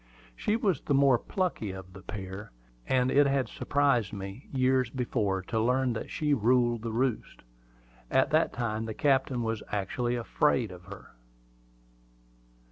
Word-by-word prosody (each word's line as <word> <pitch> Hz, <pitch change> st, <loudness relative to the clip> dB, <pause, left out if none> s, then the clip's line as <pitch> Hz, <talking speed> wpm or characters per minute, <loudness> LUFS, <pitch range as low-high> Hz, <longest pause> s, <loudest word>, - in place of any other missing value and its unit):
She 210 Hz, -, 0 dB
was 200 Hz, -, 0 dB
the 140 Hz, -, 0 dB
more 135 Hz, -3 st, +5 dB
plucky 180 Hz, -, -2 dB
of 95 Hz, -1 st, -8 dB
the 95 Hz, -, -11 dB
pair, 100 Hz, +1 st, -7 dB, 0.4 s
and 130 Hz, 0 st, +2 dB
it 145 Hz, 0 st, +5 dB
had 135 Hz, -2 st, +1 dB
surprised 140 Hz, -8 st, +1 dB
me, 100 Hz, +5 st, -8 dB
years 130 Hz, -2 st, +2 dB
before, 110 Hz, -7 st, -1 dB
to 110 Hz, +4 st, -2 dB
learn 125 Hz, +2 st, +2 dB
that 110 Hz, -, -5 dB
she 150 Hz, -1 st, 0 dB
"ruled 120 Hz, -1 st, +2 dB
the 115 Hz, 0 st, -4 dB
roost." 120 Hz, 0 st, -2 dB, 0.7 s
At 130 Hz, 0 st, +2 dB
that 155 Hz, +2 st, +3 dB
time 115 Hz, -2 st, -2 dB
the 110 Hz, -1 st, -5 dB
captain 135 Hz, -3 st, +1 dB
was 115 Hz, -1 st, -2 dB
actually 120 Hz, +5 st, -1 dB
afraid 120 Hz, -1 st, +1 dB
of 90 Hz, -1 st, -12 dB
her. 100 Hz, 0 st, -11 dB
120 Hz, 150 wpm, -29 LUFS, 105-135 Hz, 0.7 s, more